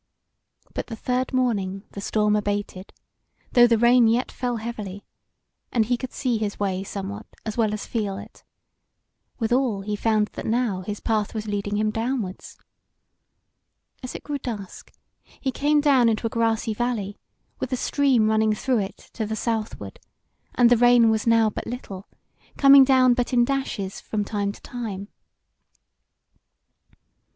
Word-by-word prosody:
But - - -4
the 230 - -6
third 250 +3 -1
morning 205 -7 0
the 200 - -7
storm 210 0 +1
abated, 205 -2 -3 0.6
though 240 -1 +7
the 230 -1 +3
rain 240 +1 +5
yet 235 +3 +1
fell 245 -2 -2
heavily, 210 -3 -6 0.7
and 225 -3 +2
he 245 +3 +1
could 255 +1 -6
see 245 -5 -1
his 210 -2 -3
way 190 -2 -1
somewhat 200 +2 -6 0.2
as 220 - -3
well 220 -3 +1
as 210 -1 -4
feel 205 -4 -2
it: 205 +2 -12 0.9
withal 240 -3 +1
he 210 +1 -3
found 215 0 +1
that - - -6
now 225 -5 0
his 205 +2 -6
path 215 -1 -1
was 215 -1 -3
leading 205 0 -2
him 215 0 +1
downwards. 225 -4 -4 1.4
As 255 - -7
it - - -7
grew 290 -1 -4
dusk, 210 -7 -7 0.5
he 265 - -1
came 295 +3 +2
down 265 -5 +4
into 220 +1 -1
a 225 - -1
grassy 225 -1 0
valley 215 -3 -2 0.4
with 255 - -4
a 255 - 0
stream 260 -5 +2
running 220 0 +2
through 255 +1 0
it 195 0 -4 0.2
to 220 -3 -3
the 220 - -3
southward, 225 0 -3 0.6
and 245 -1 +5
the 245 - +6
rain 240 -1 +6
was 220 +1 -1
now 230 -1 +5
but - - -6
little, 205 -5 -7 0.5
coming 275 -1 +8
down 260 -2 +5
but 245 +1 -1
in 240 -1 +4
dashes 240 -8 -3
from 210 -2 -3
time 200 -1 -2
to - - -14
time. 210 -5 -6
225 Hz, 160 wpm, -24 LUFS, 205-245 Hz, 1.4 s, coming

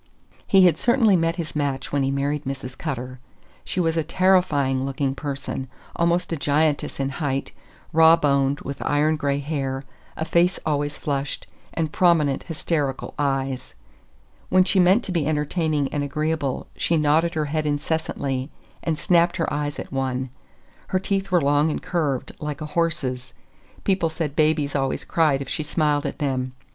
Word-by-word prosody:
He 190 -2 +6
had 175 - +4
certainly 235 -5 +4
met 165 -1 +1
his 170 -3 -5
match 140 -3 -2
when 145 - +1
he 135 - +1
married 140 +2 -1
Mrs. 130 -1 -5
Cutter. 130 -5 -5 0.4
She - - -3
was 165 -2 +1
a 160 - +2
terrifying 160 -7 +2
looking 135 0 -1
person; 135 -2 -4 0.3
almost 170 0 +1
a - - -1
giantess 145 +1 +1
in 135 0 0
height, 140 -1 -2 0.4
raw 160 +1 +7
boned, 140 -2 +1
with 140 0 -5
iron 150 +2 +2
gray 140 -2 0
hair, 135 -2 -3 0.3
a 160 - -2
face 175 +3 +2
always 145 -1 -1
flushed, 140 -1 -3 0.3
and 160 -2 -1
prominent, 165 -7 +3
hysterical 150 -4 -2
eyes. 135 -2 -1 0.7
When 185 0 +5
she 185 +1 +2
meant 185 +6 +5
to - - -4
be 165 -5 0
entertaining 150 -1 0
and 145 - 0
agreeable, 150 -1 -1
she 165 - +1
nodded 160 +3 +2
her 155 -1 0
head 155 +1 -1
incessantly 145 -3 -2 0.3
and 160 -2 -1
snapped 170 +1 +3
her 165 - -1
eyes 145 0 -2
at - - -7
one. 130 -1 -2 0.6
Her 185 - +1
teeth 195 0 -1
were 180 -2 +3
long 145 +2 +3
and - - -2
curved, 150 -8 -1
like 150 -2 -4
a 155 - -4
horse's; 150 -5 -2 0.5
people 185 -4 +1
said 155 -3 -3
babies 155 -2 +2
always 135 -1 -1
cried 150 -4 +2
if - - -13
she - - -2
smiled 150 -1 0
at - - -5
them. 130 -3 -1
150 Hz, 165 wpm, -23 LUFS, 140-165 Hz, 0.7 s, raw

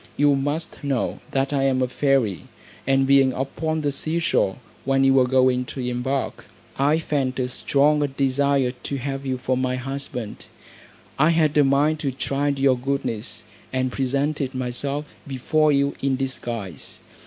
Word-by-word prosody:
You 145 0 +4
must 145 +4 -3
know, 135 -3 -1
that 135 +1 0
I 140 - +1
am 130 -1 +2
a - - +1
fairy, 125 - +1 0.4
and 135 0 +3
being 135 -1 +4
upon 155 +5 -2
the 145 -1 0
sea 155 +4 -2
shore, 160 - +1 0.3
when 135 0 +2
you 135 0 +5
were 130 -1 +4
going 130 -1 +3
to 130 - -8
embark, 125 +2 -2 0.3
I 145 +3 +3
felt 140 -5 -1
a 130 -1 0
strong 145 +4 +2 0.2
desire 140 -1 +2
to 135 +2 -6
have 135 +1 -4
you 130 -1 -1
for 130 +1 -1
my 130 0 0
husband; 130 -3 -6 0.7
I 155 +3 +5
had 160 -3 +2
a 150 - +6
mind 145 +3 +2
to 140 -3 -1
try 135 +2 -2
your 135 -2 +2
goodness, 125 -6 -3 0.3
and 130 0 0
presented 140 +1 -1
myself 135 +4 -2 0.2
before 150 +3 +2
you 140 0 +2
in 135 -1 +1
disguise. 120 - -5
135 Hz, 160 wpm, -23 LUFS, 130-140 Hz, 0.7 s, a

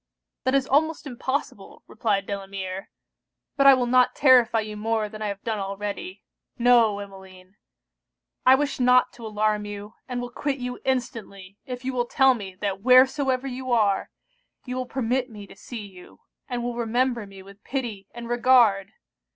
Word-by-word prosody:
'That 260 +1 +2
is 270 -1 +2
almost 310 +3 +1
impossible!' 265 +1 -5
replied 200 -3 -1
Delamere; 195 -1 -6 0.7
'but 275 -1 +4
I 275 - +9
will 250 -1 0
not 250 +1 +3
terrify 250 -4 +5
you 215 0 -7
more 220 0 -1
than 215 +1 -10
I 215 - -1
have 200 -1 -6
done 220 -2 -2
already. 205 - -5 0.3
No, 235 -4 +4
Emmeline, 190 -1 -12 0.9
I 260 - +7
wish 285 0 -2
not 250 0 +4
to 230 -2 -9
alarm 210 0 0
you, 205 +1 -8
and 250 -1 -3
will 245 0 -5
quit 275 +2 -2
you 250 -1 -5
instantly 225 -7 -4
if 250 0 -6
you 265 - -2
will 245 -1 -1
tell 265 +1 +4
me 195 -6 -8
that 195 -2 -2
wheresoever 260 +2 +4
you 255 -1 -5
are, 205 -4 +2 0.6
you 250 -1 -5
will 255 -1 -3
permit 255 0 -1
me 210 -3 -10
to - - -15
see 220 +1 -8
you; 185 -3 -15 0.3
and 245 -1 -3
will 240 0 -2
remember 240 -1 -1
me 195 -1 -13
with 200 +1 -16
pity 230 -8 -4
and 235 -1 -8
regard! 235 -5 +3
235 Hz, 170 wpm, -24 LUFS, 205-255 Hz, 0.9 s, I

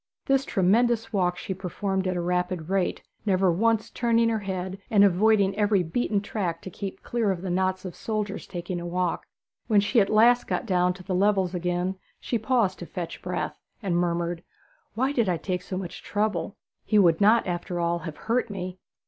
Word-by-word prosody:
This 270 -1 +2
tremendous 225 +4 +2
walk 180 -3 +1
she 190 - -4
performed 190 +1 -2
at 185 - 0
a - - -1
rapid 180 -1 -1
rate, 195 -2 0 0.2
never 190 -3 +3
once 225 +4 +1
turning 230 -1 +2
her 225 -1 0
head, 190 -1 -4
and 205 -2 +5
avoiding 200 +1 +4
every 205 -2 +2
beaten 205 +4 0
track 185 -6 -3
to 190 - -7
keep 195 +2 -6
clear 235 -3 0
of 185 -2 -2
the 185 - -2
knots 185 +1 0
of 180 - -5
soldiers 210 -3 -3
taking 175 -1 -4
a - - -6
walk. 180 0 -1 0.4
When 215 -3 +5
she 210 +3 +3
at 195 - +1
last 235 +3 +5
got - - -1
down 180 -3 +2
to 180 - -11
the 185 +1 -3
levels 190 -1 +2
again 180 +1 -1 0.2
she 235 - -2
paused 220 -5 +1
to 175 - -7
fetch 175 -2 -6
breath, - - -3 0.2
and 185 -3 0
murmured, 170 -1 0 0.5
'Why 260 +4 +1
did 235 -8 +1
I 175 - +1
take 180 +2 -3
so 185 - -5
much 180 -2 -6
trouble? 210 0 -2 0.3
He 215 - +2
would 175 -3 +5
not, 220 +3 +5
after 175 0 -3
all, 170 0 0
have 160 -3 -7
hurt 235 0 +1
me.' 185 -2 -5
190 Hz, 195 wpm, -26 LUFS, 180-215 Hz, 0.5 s, and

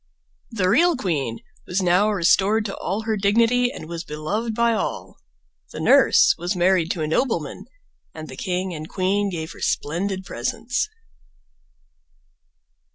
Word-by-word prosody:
The 200 -6 -1
real 330 - +4
queen 140 - -2 0.3
was 180 - -1
now 180 +4 +3
restored 205 +2 +2
to 195 - -4
all 195 +6 -3
her 220 0 -1
dignity 230 +5 +2
and 270 - -9
was 170 0 -5
beloved 200 +10 -3
by 235 0 +2
all. 215 - -4 0.5
The - - -8
nurse - - +5
was 175 +2 -2
married 180 -2 +2
to 165 - -4
a - - -1
nobleman 240 - -1 0.5
and 155 0 -9
the 130 - -9
king 180 +4 -3
and 155 0 -7
queen 200 +2 0
gave 160 -3 -5
her - - -13
splendid 190 +5 -2
presents. 225 - -2
190 Hz, 145 wpm, -22 LUFS, 165-220 Hz, 0.5 s, nurse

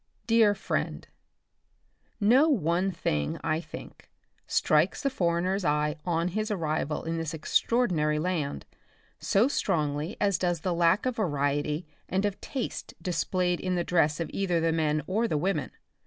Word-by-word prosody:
Dear 225 -2 +4
Friend: - - -3 1.1
No 250 +9 +5
one 185 - +1
thing, 75 - -1
I 155 +1 +1
think, 160 - -11 0.4
strikes 155 +4 +2
the 275 - +1
foreigner's 185 -2 0
eye, 150 -1 +1
on 170 0 0
his 215 +4 -2
arrival 155 -6 -1
in 165 0 -2
this 165 0 -3
extra 160 +8 +1
ordinary 155 -11 +2
land 150 - -2 0.5
so 210 +6 +3
strongly 155 - -1
as 200 -2 +2
does 175 -2 0
the 185 -2 0
lack 170 +5 +3
of 255 -2 -1
variety 145 -3 0 0.2
and 190 +2 +1
of 205 -1 -2
taste 265 -3 -5
displayed 180 -1 0
in 185 -1 -1
the 175 - 0
dress 155 -3 +2
of 165 - -3
either 180 -4 +1
the 165 0 +2
men 155 -2 +1
or 220 +7 0
the 155 - 0
women. 165 -3 -1
175 Hz, 155 wpm, -28 LUFS, 155-195 Hz, 1.1 s, No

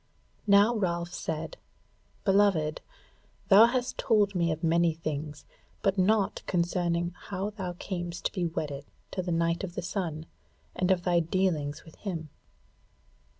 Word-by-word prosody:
Now 205 +4 +6
Ralph 175 -4 -1
said: 160 0 -4 0.7
"Beloved, 195 -7 +3 0.7
thou 210 +3 +9
hast 250 +1 -2
told 210 -4 +3
me 170 -2 +1
of 160 +2 -4
many 165 0 +3
things, 150 -2 -5 0.4
but 195 -1 +2
naught 205 +2 +2
concerning 175 -1 0 0.2
how 200 +1 -3
thou 190 -4 -5
camest 175 -1 -5
to - - +1
be 180 -3 -1
wedded 145 -3 -4 0.3
to 185 - -2
the 175 -1 -3
Knight 170 +2 +1
of 180 -2 -5
the - - -3
Sun, 170 -4 -3 0.5
and 185 - 0
of 185 -2 +2
thy 175 -1 +3
dealings 165 -4 -1
with 160 - -15
him." 165 -6 -5
175 Hz, 145 wpm, -29 LUFS, 165-195 Hz, 0.7 s, thou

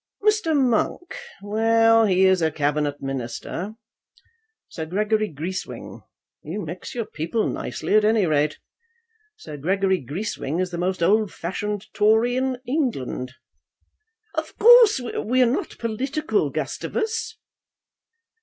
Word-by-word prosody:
Mr. 425 -8 +2
Monk; 260 +7 0 0.3
well, 225 +2 +4
he 190 0 +4
is 190 -1 +4
a 160 - +3
Cabinet 145 -1 -1
Minister. 135 - -5 0.9
Sir 160 -2 -6
Gregory 210 +3 0
Greeswing; 170 +6 -6 0.4
you 185 +6 -5
mix 175 +8 -7
your 230 -2 -2
people 170 +6 -2
nicely - - -3
at 215 0 +5
any 215 -2 +3
rate. 150 -1 +1 0.8
Sir 150 - -9
Gregory 190 +5 +1
Greeswing 160 - -3
is 185 -1 -1
the 170 - -4
most 180 0 -1
old 210 +3 +3
fashioned 205 +4 -4
Tory 220 +4 +3
in 260 0 0
England." 225 - -2 1.0
"Of 315 -1 -4
course 470 - +7
we 245 0 -1
are 255 - +6
not 240 +3 -2
political, 270 +7 -1
Gustavus." 445 0 -3
210 Hz, 120 wpm, -23 LUFS, 170-245 Hz, 1.0 s, course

